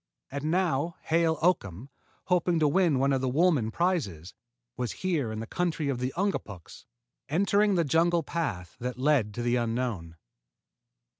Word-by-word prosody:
And 140 +1 -4
now 165 -2 0
Hale 165 0 +2
Oakham, 125 - 0 0.3
hoping 180 -2 +1
to 155 -2 +3
win 165 -1 +3
one 135 +1 +2
of 135 - 0
the 130 - 0
Woolman 145 -5 +2
prizes, 110 - -1 0.4
was 125 -2 -3
here 155 -11 0
in 110 0 -4
the - - -5
country 160 +1 -1
of 130 -3 -2
the 125 +1 -2
Ungapuks, 110 - -4 0.4
entering 200 +5 +2
the 170 -2 +2
jungle 165 +3 +2
path 115 - -4
that 125 0 -4
lead 130 -5 +2
to 120 - -3
the 120 +1 +1
unknown. 115 -8 -2
145 Hz, 155 wpm, -28 LUFS, 120-170 Hz, 0.4 s, to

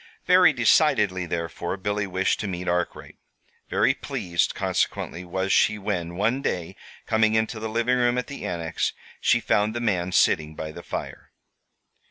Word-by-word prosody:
Very 180 -3 +6
decidedly, 110 - +3
therefore, 85 +2 -3
Billy 105 +1 -2
wished 95 +1 0
to 105 - -3
meet 90 -1 -5
Arkwright. 90 0 -2 0.5
Very - - +3
pleased, 85 -1 -2
consequently, 90 - -1
was 95 +2 -1
she 105 - +3
when, 90 -4 -3
one 115 +8 0
day, 90 - -3 0.3
coming 110 -1 +2
into 110 0 0
the 110 0 -4
living 115 +3 +1
room 120 0 +2
at 125 - -1
the 140 - -8
Annex, 85 -2 -2 0.3
she - - +3
found 105 +2 +1
the - - -1
man 95 -6 0
sitting 75 -3 +2
by 80 0 -5
the - - -9
fire. - - -7
100 Hz, 160 wpm, -25 LUFS, 85-110 Hz, 0.5 s, Very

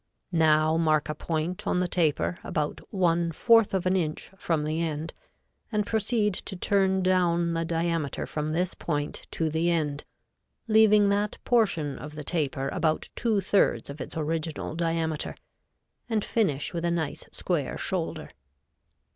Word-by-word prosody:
Now 155 -1 +4
mark 155 -2 +2
a - - 0
point 160 +3 -3
on 180 - +2
the 180 - +1
taper 170 0 +1
about 150 -2 -2
one 170 -3 +2
fourth 225 +5 +4
of 190 -2 -1
an 185 +1 +2
inch 160 -3 -2
from 165 -5 -1
the 155 +2 -1
end, 160 0 -3 0.6
and 210 -2 +1
proceed 220 -1 +1
to 190 - -5
turn 190 0 +2
down 175 -2 +2
the 165 0 0
diameter 165 -3 -1
from 150 0 -3
this 175 +4 0
point 145 -3 -3
to 165 - -1
the 160 +2 +1
end, 150 -4 0 0.6
leaving 215 -2 +5
that 205 +1 0
portion 165 - +1
of 150 +4 -8
the 150 - -6
taper 140 -4 -1
about 160 -3 0
two 220 -4 +1
thirds 140 - +2
of 140 - -8
its - - -7
original 160 0 -2
diameter, 165 -2 -1 0.7
and 220 -3 0
finish 155 -12 0
with 170 -1 -3
a 170 - +1
nice 165 -4 -2
square - - -2
shoulder. - - -3
165 Hz, 155 wpm, -27 LUFS, 155-190 Hz, 0.7 s, leaving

